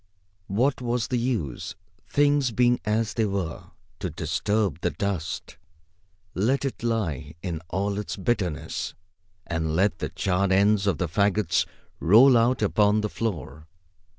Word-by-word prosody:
What 125 +8 +1
was 120 -1 -1
the 125 - +1
use, 110 - -2 0.3
things 145 -2 +3
being 120 +1 +3
as 110 +1 0
they 115 - +1
were, 95 -5 -3 0.3
to 90 - -3
disturb 90 +3 -1
the 90 - +1
dust? 85 0 -4 0.8
Let 130 +9 +1
it 135 - -4
lie 85 - -2
in 85 -4 -3
all 100 +3 -1
its 105 - -4
bitterness. 95 -7 -2 0.5
And 80 -1 -2
let 95 0 +2
the - - -2
charred 95 0 0
ends 100 +1 +3
of 95 -6 +2
the 90 - -1
fagots 100 +1 +1 0.3
roll 120 +9 +7
out 115 0 +3
upon 105 0 +3
the 105 - -2
floor. 80 - -4
100 Hz, 140 wpm, -25 LUFS, 85-115 Hz, 0.8 s, roll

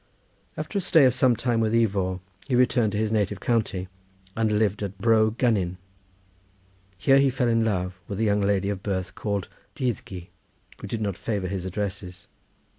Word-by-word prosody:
After 200 - -2
a - - -2
stay 160 -5 +5
of 125 - +4
some 125 -1 +3
time 120 0 0
with 110 -1 +1
Ifor 95 -5 +1 0.3
he 130 - +1
returned 125 -3 +3
to - - -1
his 110 0 0
native 105 -2 0
county 105 -6 -1 0.5
and 110 -1 +1
lived 105 -1 +1
at 100 -1 -4
Bro 110 +1 +3
Gynnin. 100 -8 +1 1.2
Here 135 +8 +4
he 140 0 +4
fell 125 -1 0
in 115 -1 +2
love 90 -4 -2
with 100 - -5
a - - +1
young 105 -1 +2
lady 100 -1 +1
of 100 -2 -3
birth 95 -3 -3
called 100 -1 -3 0.3
Dyddgu, 100 -8 -3 0.6
who - - -6
did 115 - -3
not 100 -4 -2
favour 100 -5 -2
his 95 -2 -4
addresses. 95 -2 -5
105 Hz, 180 wpm, -25 LUFS, 95-115 Hz, 1.2 s, stay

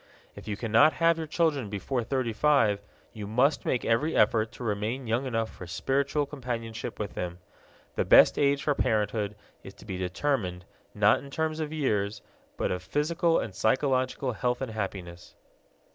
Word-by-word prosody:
If - - -11
you 105 -2 -3
cannot 115 +7 +4
have 165 +1 +2
your 160 - -4
children 150 - 0
before 115 +5 -2
thirty 125 -1 -1
five, 110 -7 +3 0.3
you 105 -3 -6
must 125 +8 +2
make 125 - 0
every 130 +8 +1
effort 110 +1 +3
to - - -9
remain 110 +4 -2
young 120 +4 0
enough 115 -3 -1
for 90 - -10
spiritual 140 - 0
companionship 120 -4 -5
with 105 -2 -4
them. 90 -1 -4 0.6
The - - 0
best - - +6
age 140 -1 +2
for 145 - +2
parenthood 105 -3 0 0.3
is 95 - -11
to - - -15
be 95 -3 -5
determined, 90 -2 -2 0.3
not - - +4
in 140 - -10
terms 160 +2 -2
of 155 -1 -3
years, 105 -9 -1 0.3
but - - -1
of 90 - -2
physical 165 - +1
and 105 - -3
psychological 130 +3 +1
health 125 +2 -1
and 130 -4 -4
happiness. 95 -5 -6
120 Hz, 170 wpm, -28 LUFS, 105-140 Hz, 0.6 s, best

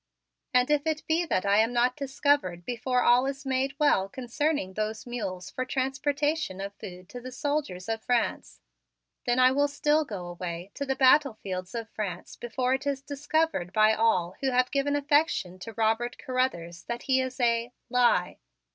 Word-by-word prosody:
And 250 +3 +3
if 295 +1 +2
it 310 -1 -1
be 335 +2 +1
that 185 - 0
I 200 +1 +4
am 225 +2 +3
not 245 +1 +2
discovered 270 - 0
before 245 +1 0
all 250 +2 +5
is 275 +1 -5
made 265 +1 0
well 195 -10 +3
concerning 260 -2 -2
those 215 +2 -3
mules 195 -7 -5
for 255 - -2
transportation 275 -2 -1
of 200 +1 -5
food 180 -2 -10
to 245 - -8
the 255 +1 -8
soldiers 260 -10 -2
of 225 0 -2
France, 245 -2 -1 0.7
then 240 0 +2
I 255 0 +6
will 285 +2 +2
still 295 +2 +2
go 200 -10 -6
away 175 +1 -6
to 280 - -4
the 265 - 0
battlefields 225 -9 +2
of 230 -1 -4
France 195 -6 -5
before 250 +2 -1
it 265 +2 -2
is 275 -1 -1
discovered 290 - -1
by 215 0 +5
all 200 -6 +2
who 270 - +1
have 250 0 +2
given 285 0 +1
affection 290 - +1
to 225 +5 -8
Robert 225 +2 0
Carruthers, 175 -10 -2
that 235 0 -4
he 260 -1 +2
is 260 +1 -5
a 235 0 +1 0.2
lie. 240 -7 +2
250 Hz, 175 wpm, -28 LUFS, 205-275 Hz, 0.7 s, I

